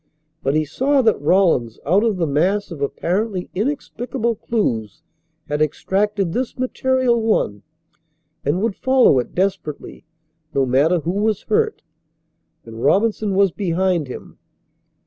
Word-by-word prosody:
But 135 +2 0
he 155 0 +2
saw 265 - +1
that 220 -9 +2
Rawlins 150 - +2
out 185 +8 +3
of 220 -4 +1
the 170 - +1
mass 180 +8 0
of 155 -4 -7
apparently 185 +7 -2
inexplicable 245 +1 -2
clues 165 - -2 0.4
had 150 +1 -2
extracted 195 +4 0
this 255 -1 -3
material 255 -1 +1
one 160 - 0 0.8
and 165 +8 0
would 225 -4 0
follow 260 - +4
it 120 - -5
desperately 185 -6 -3 0.5
no 135 -1 +3
matter 145 +7 +2
who 165 - -2
was 210 +1 0
hurt; 440 0 0 0.8
and 115 0 -9
Robinson 205 - +2
was 195 -1 +4
behind 180 -3 0
him. 125 - -10
190 Hz, 130 wpm, -20 LUFS, 150-225 Hz, 0.8 s, follow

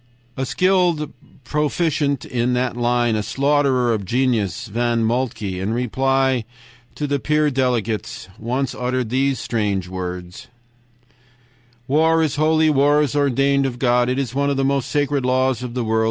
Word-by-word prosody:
"A 130 0 -3
skilled 180 -4 +1 0.3
proficient 150 0 0
in 125 0 -1
that 125 -1 -1
line, 120 -1 +1
a 105 - 0
slaughterer 135 -1 +1
of 105 -2 -2
genius, 115 -2 0
Von 115 +1 0
Moltke, 110 -5 -2
in 100 +4 -2
reply 130 +1 +1 0.5
to 150 - -3
the 145 -1 -1
peace 150 +1 +1
delegates, 120 -7 -2
once 125 +4 -2
uttered 125 -2 -2
these 135 +1 +1
strange 100 -5 -2
words: 90 +5 -6 1.4
"'War 160 +3 +3
is 150 -2 -1
holy, 155 +1 +3
war 145 +1 +3
is 145 -1 -2
ordained 140 0 +2
of 125 -2 -5
God. 120 -1 +2
It 130 - -1
is 130 -4 -2
one 140 +1 +1
of 140 - -1
the 135 - +1
most 140 -1 0
sacred 145 -2 0
laws 130 -1 +1
of 125 -1 -6
the 125 - -1
world. 110 0 0
130 Hz, 155 wpm, -20 LUFS, 120-140 Hz, 1.4 s, War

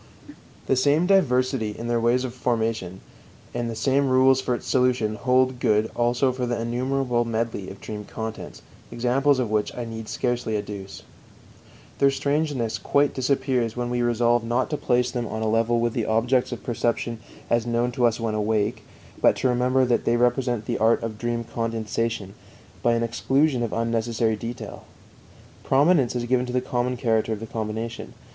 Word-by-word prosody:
The 135 - +2
same 145 +6 +3
diversity 130 - +2
in 115 - -5
their 120 -1 +1
ways 120 +2 +2
of 125 -2 -4
formation 110 -7 -2 0.5
and 120 -1 -2
the 115 - -4
same 135 +4 +1
rules 130 +1 +4
for 125 -1 0
its - - -8
solution 125 -4 +1
hold 130 +2 +1
good 110 -1 +2
also 120 +2 +2
for 125 -1 -3
the 120 -1 -1
innumerable 125 +1 0
medley 115 -4 -3
of 95 - -10
dream 105 -1 -7
contents, 110 +1 -7 0.3
examples 130 +4 +2
of 120 -4 -1
which 105 -1 0
I 120 - -3
need 115 -1 -7
scarcely 120 -3 -1
adduce. 100 -2 -7 1.0
Their 140 - +5
strangeness 140 -4 -1
quite 145 0 +2
disappears 130 -3 0
when 120 0 -2
we 120 0 0
resolve 120 0 +2
not 120 +5 -1
to - - +1
place 125 -2 +1
them 120 -2 -3
on 110 +1 -4
a - - 0
level 115 +2 +2
with 120 0 0
the 115 - -1
objects 120 +4 +1
of 120 - -6
perception 120 -1 -1 0.3
as 120 0 +1
known 120 +1 0
to 120 0 +3
us 115 - -1
when 115 -1 -1
awake, 110 +2 0 0.4
but - - +5
to 130 - 0
remember 125 +1 +2
that 120 -1 +1
they 120 - +2
represent 120 -2 +1
the - - -2
art 115 +1 +3
of 110 -2 -5
dream 120 0 -2
condensation 115 -3 -3 0.5
by 120 - +3
an 115 0 +1
exclusion 135 +3 +1
of 115 - -2
unnecessary 115 -1 0
detail. 115 +3 -7 0.8
Prominence 140 -2 +3
is 120 -1 -1
given 125 +1 +1
to 125 - -5
the 125 - +2
common 125 0 -2
character 110 -2 +1
of 105 - -5
the 115 - -6
combination. 110 +1 -5
120 Hz, 180 wpm, -24 LUFS, 115-125 Hz, 1.0 s, Their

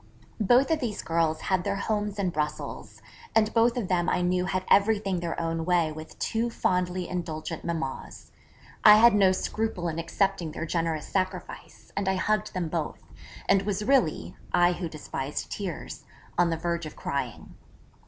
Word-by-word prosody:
Both 245 - +4
of 320 - +2
these 230 -6 -3
girls 165 -1 +1
had 185 -2 0
their 200 +1 -1
homes 210 0 -2
in 190 -3 0
Brussels, 150 -1 -4 0.3
and 215 -1 +3
both 235 +1 +3
of 225 -6 -1
them 180 -1 +1
I 180 - +1
knew 180 0 +1
had 185 0 -2
everything 200 -2 +3
their 170 -1 -3
own 165 0 -1
way 170 -2 +2
with 155 +1 -10
two 230 +2 -1
fondly 180 -4 0
indulgent 165 -2 -4
mammas. 160 -6 -5 0.5
I 210 - +10
had 235 +1 +7
no 195 -2 +5
scruple 190 -1 -2
in 165 0 -3
accepting 175 -1 -1
their - - -4
generous 165 -2 -1
sacrifice, 185 -1 -4
and 195 -1 0
I 190 - +2
hugged 215 +2 0
them 180 -2 -1
both, 160 -1 -3 0.4
and 195 -1 +4
was 205 +1 -2
really 210 - +2 0.2
(I 175 0 +4
who 175 -1 -4
despised 150 -2 -5
tears) 190 -5 -5 0.3
on 175 0 +3
the 165 - -1
verge 170 0 -2
of 155 - -10
crying. 140 -4 -4
180 Hz, 170 wpm, -27 LUFS, 165-205 Hz, 0.5 s, I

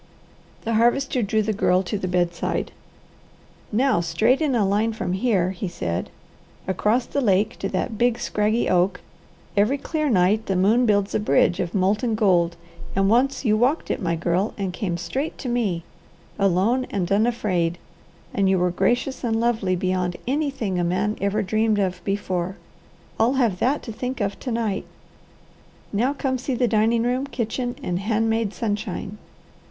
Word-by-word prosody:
The 230 - -1
Harvester 240 +3 +2
drew 215 +1 +1
the 215 +1 -1
Girl 185 -2 +2
to 195 - -4
the 195 -2 -2
bedside. 175 -1 -1 1.0
"Now 250 -1 +2
straight 220 - +2
in 290 -5 +1
a 215 -4 +3
line 210 +3 +1
from 180 -4 -3
here," 190 -3 +1
he 190 +1 -4
said, 90 - -3 0.6
"across 210 +6 +1
the 280 - -2
lake 210 0 +1
to - - -2
that 220 -4 -3
big, 240 -1 +3
scraggy 215 +3 0
oak, 180 0 +2 0.5
every 210 +7 +3
clear 305 +1 -2
night 210 +1 +2
the 195 - 0
moon 220 +7 +3
builds 205 -1 +2
a - - +2
bridge 175 -3 +2
of 175 - -2
molten 210 +4 +1
gold, 175 -5 +2 0.4
and 195 +1 +3
once 270 +4 +2
you 215 -2 +4
walked 255 +8 +1
it, - - -2
my 170 -3 0
girl, 175 +5 0
and 195 -3 -3
came 180 -4 -2
straight 265 - -3
to 265 - -6
me, 215 -9 0 0.6
alone 200 +7 +2
and 190 -2 -2
unafraid; 200 -6 +1 0.6
and 195 -1 +2
you 190 - +3
were 180 0 +1
gracious 240 +9 0
and 225 -2 0
lovely 225 -6 +1
beyond 180 -1 -1
anything 265 -9 -1
a - - +1
man 185 +5 0
ever 200 +2 +1
dreamed 215 +2 +1
of 185 -3 -1
before. 190 -2 -2 0.6
I'll 235 +4 +3
have 235 -9 +1
that 275 +4 +1
to 230 - -6
think 250 +4 -4
of 200 -2 -2
to 255 - -4
night. 225 -4 -1 1.1
Now 245 +7 +1
come 260 -2 -1
see 255 +1 -2
the 245 0 +2
dining 225 +1 +2
room, 250 +3 0
kitchen, 245 -1 -3
and 180 0 -1
hand 225 +2 +1
made 225 -2 0
sunshine." 210 -2 -3
210 Hz, 170 wpm, -23 LUFS, 185-240 Hz, 1.1 s, you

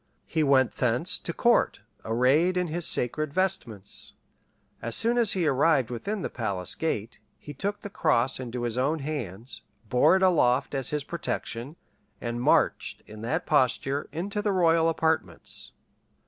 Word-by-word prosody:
He 160 - -1
went 135 -4 +4
thence - - +1
to - - -3
court - - +2 0.2
arrayed 135 +11 +2
in 180 -2 0
his 170 +1 0
sacred 150 +5 +1
vestments: 120 - -2 0.7
as 115 - -1
soon 230 +1 +4
as 235 -3 +4
he 180 -3 0
arrived 135 -3 +2
within 200 - -4
the - - -2
palace 95 -6 -1
gate, 120 -8 -3 0.2
he 145 - -10
took 200 +8 -3
the 205 - -7
cross 135 -8 +1
into 125 -1 -5
his 120 +1 -2
own 145 +5 +1
hands, 125 - -6 0.3
bore 125 - +5
it 190 - +1
aloft 140 -8 +3
as 135 -3 -1
his 150 -1 -2
protection, 140 -4 -5 0.4
and 120 0 -4
marched - - +1
in 105 0 -11
that 150 +10 -2
posture 140 0 +1
into 195 +7 -3
the 205 0 0
royal 165 -3 +3
apartments. 160 0 -1
145 Hz, 155 wpm, -27 LUFS, 120-170 Hz, 0.7 s, bore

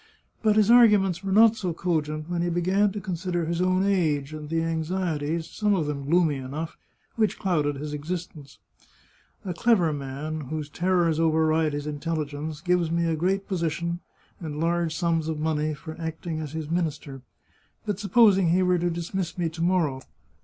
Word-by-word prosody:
But 215 -2 +3
his 215 +1 +4
arguments 205 -7 +5
were 195 - -2
not 220 +2 +6
so 185 -6 -3
cogent 155 -3 -2
when 175 -1 -2
he 175 - 0
began 185 +4 +2
to 205 - -5
consider 180 -2 -2
his 170 +2 -1
own 185 +1 +2
age, 155 -7 +1
and 150 -1 -7
the 165 0 0
anxieties, 165 -1 -2
some 210 -1 0
of 165 -5 0
them 140 -2 -4
gloomy 160 -1 +2
enough, 145 +5 -5 0.4
which 215 -2 +1
clouded 150 -6 0
his 150 +2 -5
existence. 150 -2 -6 0.4
" - - -34
A 185 - -2
clever 175 -4 +3
man, 145 +3 -5
whose 155 -2 -4
terrors 175 -2 +1
override 160 -1 +2
his 145 0 -3
intelligence, 150 0 -4
gives 180 -1 +1
me 170 +1 +1
a 165 -1 +1
great 190 +5 0
position 170 -1 -2 0.4
and 150 -3 -5
large 170 0 0
sums 165 -2 0
of 160 -1 -2
money 155 0 -1
for 160 +1 -9
acting 160 0 -4
as 155 -2 -6
his 160 -1 -4
minister. 155 -5 -3 0.6
But 205 -3 -2
supposing 200 -3 +4
he 180 +3 +3
were 180 -1 +2
to 175 +1 0
dismiss 170 +1 -3
me 170 -2 0
to 165 +1 -8
morrow? 165 -7 +1
165 Hz, 175 wpm, -26 LUFS, 155-180 Hz, 0.6 s, not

